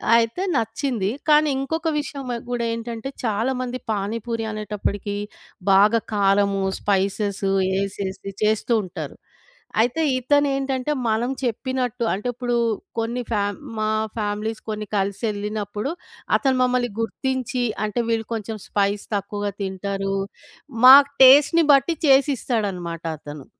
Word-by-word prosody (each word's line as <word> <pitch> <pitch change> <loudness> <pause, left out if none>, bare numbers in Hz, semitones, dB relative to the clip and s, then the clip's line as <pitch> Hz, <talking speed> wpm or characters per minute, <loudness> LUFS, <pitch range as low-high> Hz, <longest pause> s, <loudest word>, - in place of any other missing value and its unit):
అయితే 230 +10 +1
నచ్చింది. 225 -2 -1 0.2
కానీ 305 0 +6
ఇంకొక 320 +4 -2
విషయం 285 -2 -5
వ - - -1 0.2
గూడా 240 -1 -1
ఏంటంటే 230 +2 -5
చాలా 225 +3 0
మంది 255 0 -3
పానీపూరి 225 +3 -2
అనేటప్పడికి 205 -1 -3 0.6
బాగా 205 +4 +5
కారము, 200 -1 +2 0.2
స్పైసెస్ 200 0 0 0.3
యేసేసి 195 0 -3
చేస్తూ 215 +2 +1
ఉంటారు. 175 -6 -7 0.7
అయితే 245 +7 +1 0.2
ఇతనేంటంటే 275 0 +1 0.2
మనం 230 +4 0
చెప్పినట్టు 250 0 -2
అంటే 210 +6 -3
ఇప్పుడు 245 0 -2 0.4
కొన్ని 235 +2 -2
ఫ్యామ్ 205 -1 0 0.2
మా 215 0 0 0.3
ఫ్యామిలీస్ 210 +1 -2
కొన్ని 215 0 -3
కలిసెళ్ళినప్పుడు 205 +3 -2 0.5
అతను 265 -2 +1
మమ్మల్ని 250 -1 +1
గుర్తించి, 255 +1 -2 0.2
అంటే 210 +2 -2
వీళ్ళు 225 -1 0
కొంచెం 220 0 -5
స్పైస్ 200 0 0
తక్కువగా 205 0 -3
తింటారు. 195 0 -2 0.7
మాకు 275 +2 +10
టేస్ట్‌ని 290 +5 +7
బట్టి 275 +4 +3
చేసిస్తాడన్నమాట 220 - +1 0.2
అతను. 145 -2 -9
225 Hz, 110 wpm, -23 LUFS, 200-255 Hz, 0.7 s, మాకు